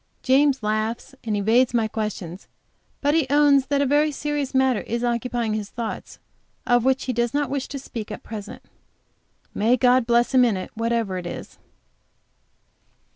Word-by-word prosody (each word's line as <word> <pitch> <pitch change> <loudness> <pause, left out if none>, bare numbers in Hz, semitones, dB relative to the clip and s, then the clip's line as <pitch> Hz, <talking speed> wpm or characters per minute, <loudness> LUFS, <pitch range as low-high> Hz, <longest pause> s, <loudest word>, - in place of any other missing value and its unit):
James 270 -1 +3
laughs, 215 +5 -2
and 215 -3 -1
evades 230 +5 +3
my 225 -2 +2
questions. 205 -5 -5 0.5
But 290 0 +2
he 320 -4 +2
owns 285 -2 +4
that 285 -1 +1
a - - +1
very 295 +3 +3
serious 295 -1 -3
matter 260 -4 +3
is 235 +1 -3
occupying 240 -2 -1
his 210 -1 -3
thoughts, 230 -2 -6 0.5
of 245 -1 +3
which 265 +1 +2
he 255 - -1
does 240 +1 -1
not 290 -3 0
wish 275 -1 -2
to 280 - -6
speak 230 -5 -7
at 210 - -7
present. 215 -2 -8 0.9
May 235 +4 +2
God 250 -1 +3
bless 240 +2 +2
him 255 -1 +6
in 225 -5 +2
it, 185 - -6
whatever 230 -4 -1
it 175 - -7
is. - - -8
240 Hz, 170 wpm, -23 LUFS, 220-270 Hz, 0.9 s, him